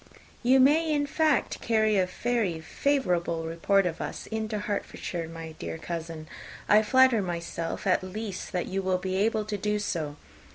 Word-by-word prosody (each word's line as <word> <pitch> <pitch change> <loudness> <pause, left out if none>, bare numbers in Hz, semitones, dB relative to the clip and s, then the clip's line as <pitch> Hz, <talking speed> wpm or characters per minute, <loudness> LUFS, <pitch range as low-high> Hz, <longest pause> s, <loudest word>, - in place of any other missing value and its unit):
"You 255 +2 +5
may, 310 +5 +5
in 290 -1 +2
fact, 310 +1 +1
carry 220 -2 +2
a 185 - +2
very 215 -4 -1
favourable 175 - 0
report 175 +4 +2
of 165 -2 -2
us - - -5
into 220 -1 -3
Hertfordshire, 200 -4 -3
my 165 -1 -7
dear 85 -1 -4
cousin. 165 - -6 0.4
I 210 +1 +6
flatter 260 0 +5
myself, 170 -1 -4
at 185 - +3
least, 195 +1 -5
that 180 -3 -1
you 195 +1 -2
will 185 -1 +1
be 185 +1 -3
able 215 +1 +1
to 210 -1 -3
do 210 +2 0
so. 160 -8 -2
195 Hz, 165 wpm, -28 LUFS, 170-225 Hz, 0.4 s, I